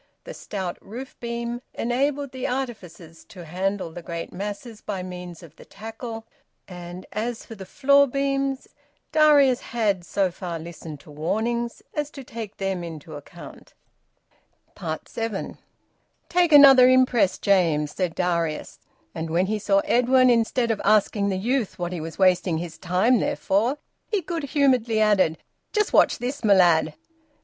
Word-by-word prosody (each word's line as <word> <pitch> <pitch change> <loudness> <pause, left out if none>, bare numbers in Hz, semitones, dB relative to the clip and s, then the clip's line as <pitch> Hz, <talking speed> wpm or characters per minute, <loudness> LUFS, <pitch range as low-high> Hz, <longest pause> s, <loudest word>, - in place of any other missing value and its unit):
The - - -8
stout 190 -4 -5
roof 250 +6 -9
beam 235 0 -4
enabled 275 +3 -1
the 260 0 -4
artificers 185 -11 -6
to 180 -5 -12
handle 185 +2 -2
the 175 - -8
great 170 0 -6
masses 205 +4 -6
by 195 -3 -4
means 180 -2 -8
of 165 -2 -14
the - - -13
tackle; 225 +1 -8 0.4
and 175 0 -9
as 225 +2 -4
for - - -10
the 190 -4 -10
floor 280 +1 +4
beams, 275 0 -1 0.4
Darius 295 -5 +5
had 210 -6 -1
so 190 +1 0
far 175 -2 -5
listened 160 -2 -9
to 150 - -15
warnings 230 +10 -2
as 295 -1 -2
to 275 - -7
take 225 -4 -8
them 195 -2 -2
into 160 -2 -8
account. 150 +4 -12 1.3
SEVEN. 225 -4 -4 0.7
"Take 350 -1 +2
another 270 -3 +9
impress, 255 -6 +3
James," 165 -7 +2
said 180 -4 -2
Darius. 170 -3 -2 0.3
And 160 0 -4
when 170 +3 +2
he 215 +2 -2
saw 200 -1 +2
Edwin, 255 +1 +4
instead 230 0 +1
of 215 - -2
asking 205 -1 +2
the 190 - -1
youth 235 +2 -1
what 175 0 -3
he 170 - -4
was 165 +1 -7
wasting 185 -3 +3
his 165 -1 -7
time 190 +8 +2
there - - -1
for, 225 +9 0 0.3
he 415 -3 -1
good 330 -2 -4
humouredly 255 -6 +2
added: 195 -7 +3 0.3
"Just 425 -1 0
watch - - +4
this, 255 +3 -4
my 205 -2 +5
lad." 165 -4 +4
210 Hz, 155 wpm, -24 LUFS, 175-250 Hz, 1.3 s, another